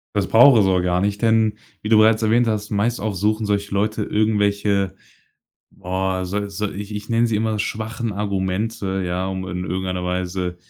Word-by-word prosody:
Das 100 -2 0
braucht 120 +1 +7
es 100 - +3
auch 95 -1 +2
gar 90 0 +1
nicht, 100 +1 -1
denn 110 -2 +3 0.3
wie 105 - -5
du 110 - +6
bereits 110 +1 +5
erwähnt 115 +2 +3
hast, 105 -2 -2
meist 105 +2 0
auch 105 -1 -3
suchen 105 +3 0
solche 100 0 -1
Leute 105 +2 0
irgendwelche, 100 -2 +1 0.8
boah, 95 0 -3
so 100 +2 -3
so, 105 +1 -3
ich 105 +1 -7
ich 105 +2 -7
nenne 115 +1 +3
sie 115 -2 0
immer 110 0 -1
schwachen 110 +1 -3
Argumente, 95 0 -2
ja, 90 +1 -2
um 95 -1 -4
in 90 0 -4
irgendeiner 90 -1 -3
Weise 90 0 -3
100 Hz, 185 wpm, -21 LUFS, 95-110 Hz, 0.8 s, braucht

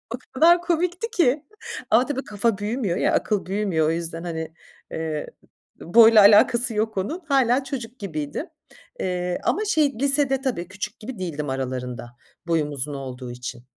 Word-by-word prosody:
O - - -9 0.2
kadar 340 +6 +5
komikti 350 +5 -1
ki, 310 - +2 0.5
ama 235 +4 +5
tabii, 275 -1 -3
kafa 210 +1 0
büyümüyor 210 -3 -2
ya, - - +1
akıl 210 -3 0
büyümüyor. 190 -5 0
O - - +2
yüzden, 165 0 -4
hani, 160 -2 -5 0.4
eee, 155 -2 -3 0.5
boyla 225 +3 +7
alakası 225 +4 +5
yok 220 0 -1
onun. 290 - -2
Hâlâ, 265 -2 +3
çocuk 255 -2 -6
gibiydim, 155 - -4 0.5
eee, 180 -1 -2
ama, 430 - 0
şey, 310 -8 +2
lisede 275 -1 +1
tabii 245 -11 -2
küçük 200 +4 -6
gibi 230 -2 -7
değildim 150 -5 -4
aralarında, 125 -2 -4 0.3
boyum 160 -3 +1
uzun 145 +1 -4
olduğu 130 -2 -7
için. 120 0 -7
205 Hz, 155 wpm, -23 LUFS, 160-265 Hz, 0.5 s, boyla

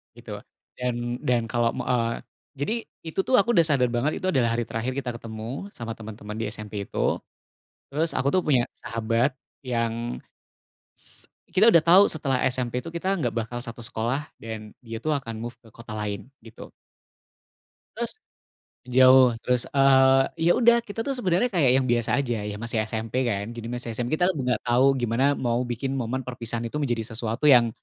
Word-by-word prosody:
gitu, - - -8 0.4
dan 120 -1 -2
dan 125 -1 +3
kalau 120 -1 +2
me - - -3
eee, 120 -2 +2 0.5
jadi 145 +10 0 0.3
itu, 160 - -4
tuh, - - -2
aku 220 - -6
udah 170 - +6
sadar 130 -4 +3
banget, 130 +6 +1
itu 185 - -1
adalah 130 -9 +2
hari 120 0 0
terakhir 115 +3 -2
kita 130 -2 -4
ketemu 110 -2 -8 0.3
sama 115 -1 -5
teman-teman 105 -1 -8
di 115 - -2
SMP 105 -1 -8
itu, - - -10 0.9
terus 155 +4 0
aku, 135 - +1
tuh, 185 - +3
punya 135 -5 +4 0.2
sahabat 115 +3 0 0.4
yang 115 0 -2 0.8
s - - -8 0.2
kita 185 +5 +4
udah 170 - +7
tau 185 +4 +8
setelah 135 -4 0 0.2
SMP, 125 -2 -2
tuh, 165 - -7
kita 170 - -3
nggak 120 -6 -1
bakal 120 +2 -4
satu 115 +1 -7
sekolah 120 +4 -1 0.2
dan 110 -1 -7
dia, 115 0 -5
tuh, 155 - 0
akan 115 -4 -7
move 120 0 -7
ke 115 - -18
kota 115 -1 -11
lain, 105 -1 -3 0.3
gitu. 115 - -13 1.4
Terus - - 0 0.8
jauh, 130 0 +7
terus, 125 -1 +2
eee, 135 -1 +6 0.2
ya, 165 +2 +4
udah 235 0 +6
kita, 215 -1 -8
tuh, 275 - 0
sebenernya 190 -2 +1
kayak 155 -10 +4
yang 130 - -1
biasa 120 -1 +2
aja, 120 -5 -1
ya, 105 0 -4
masih 115 -1 -1
SMP, 115 +3 -2
kan, 100 -2 -1
jadi 115 -1 -6
masih 120 -1 -4
SMP, 125 +5 0
kita 180 - +3
nggak 125 -5 -1
tau 125 +3 +4
gimana 125 +4 +1
mau 120 -1 0
bikin 120 +3 -3
momen 130 +1 -2
perpisahan 120 -2 -3
itu 115 - -9
menjadi 120 -5 -1
sesuatu 115 +3 -3
yang 120 -4 +7
120 Hz, 180 wpm, -25 LUFS, 115-135 Hz, 1.4 s, tau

